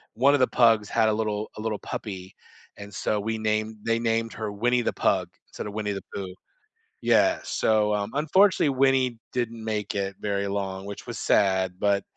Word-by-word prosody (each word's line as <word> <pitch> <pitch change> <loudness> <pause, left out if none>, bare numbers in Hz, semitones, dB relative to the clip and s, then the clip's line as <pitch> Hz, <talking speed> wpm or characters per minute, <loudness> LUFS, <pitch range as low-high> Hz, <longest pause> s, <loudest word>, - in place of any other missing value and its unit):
one 135 +5 +4
of 145 - +1
the 130 - +5
pugs 115 -4 +4
had 110 -1 +3
a - - +2
little 105 -1 -2
a - - -5
little 110 -2 -2
puppy, 95 -2 -7 0.4
and 100 -1 -10
so 105 +1 -1
we 110 +2 -2
named 110 0 -1
they 115 0 +1
named 115 0 0
her 110 -2 -4
Winnie 120 +4 +1
the - - -1
Pug - - +1 0.2
instead - - -7
of 100 - -7
Winnie 105 -1 -2
the 95 - -6
Pooh. 95 -2 -5 0.7
Yeah, 325 -1 +4
so, 105 -1 +1
um, 100 +1 -2
unfortunately, 185 +3 +4
Winnie 130 -2 +2 0.2
didn't 115 -2 -3
make 105 -2 -3
it 100 -1 -2
very 100 -1 -1
long, 95 -1 -3
which 100 0 -8
was - - -5
sad, 95 -2 +2
but, 100 -1 +2
110 Hz, 190 wpm, -26 LUFS, 100-115 Hz, 0.7 s, the